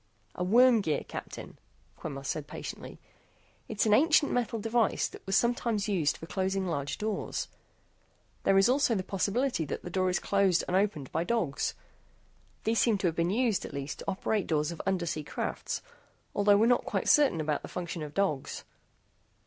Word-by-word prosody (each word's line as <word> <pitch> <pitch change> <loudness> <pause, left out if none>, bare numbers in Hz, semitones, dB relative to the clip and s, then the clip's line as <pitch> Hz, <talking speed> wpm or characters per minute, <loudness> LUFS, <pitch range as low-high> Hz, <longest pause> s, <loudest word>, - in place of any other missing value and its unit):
"A 180 - -3
worm 235 +4 +5
gear, 155 -6 -1
Captain," - - -8 0.4
Quemos 135 -3 -7
said 150 -1 -3
patiently. - - -7 0.7
"It's 215 0 0
an 215 - +4
ancient 305 +4 +4
metal 235 -2 0
device 225 +1 +1
that - - -12
was 195 - +1
sometimes 235 -3 +1
used 175 -8 +1
for - - -9
closing 190 +2 -1
large 145 -5 -2
doors. 215 -1 -3 0.9
There 195 - +3
is 195 - +6
also 255 -2 +3
the 190 - -1
possibility 200 +3 0
that - - -5
the 175 - -7
door 185 0 +1
is 180 - +1
closed 195 -3 +2
and 180 - 0
opened 190 -9 0
by 160 - 0
dogs. 175 -10 -1 0.9
These 225 +1 +1
seem 225 -4 +3
to 190 - -3
have 160 - -6
been 170 +1 +1
used, 225 0 +1
at - - -7
least, 140 +1 -5
to - - -8
operate 200 +1 -1
doors 150 0 0
of 170 - -6
undersea 170 -5 -1
crafts. - - -4 0.5
Although 205 0 +4
we're 220 - +4
not 245 +1 +3
quite - - -2
certain 285 - +5
about 150 -1 -1
the - - -8
function 175 -2 -5
of 150 -1 -7
dogs." 155 -9 -1
195 Hz, 180 wpm, -29 LUFS, 165-225 Hz, 0.9 s, is